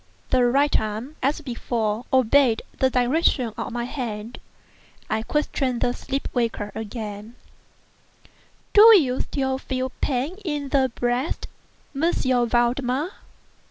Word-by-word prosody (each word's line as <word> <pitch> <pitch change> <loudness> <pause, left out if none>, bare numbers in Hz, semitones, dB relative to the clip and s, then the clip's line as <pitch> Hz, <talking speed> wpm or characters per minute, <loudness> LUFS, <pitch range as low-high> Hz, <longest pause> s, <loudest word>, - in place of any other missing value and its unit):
The 255 -1 +4
right 280 +4 +3
arm, 220 +7 -5
as 285 +4 0
before, 235 -3 -2
obeyed 260 -1 +4 0.2
the 260 - +4
direction 250 -1 +1
of - - -5
my 240 0 -3
hand. 235 -3 -5 0.7
I 220 - +1
questioned 265 -2 -1
the 245 - +1
sleep 275 +2 -4
waker 230 -4 -1
again: 215 0 -6 1.4
"Do 435 +1 +9
you 255 -4 0
still 265 -1 -2
feel 260 -1 -3
pain 275 +7 -1
in 295 -5 -3
the 265 -2 +2
breast, 245 +4 -1 0.5
M. 325 +5 +2 0.4
Valdemar?" 250 +6 +1
255 Hz, 120 wpm, -23 LUFS, 235-275 Hz, 1.4 s, Do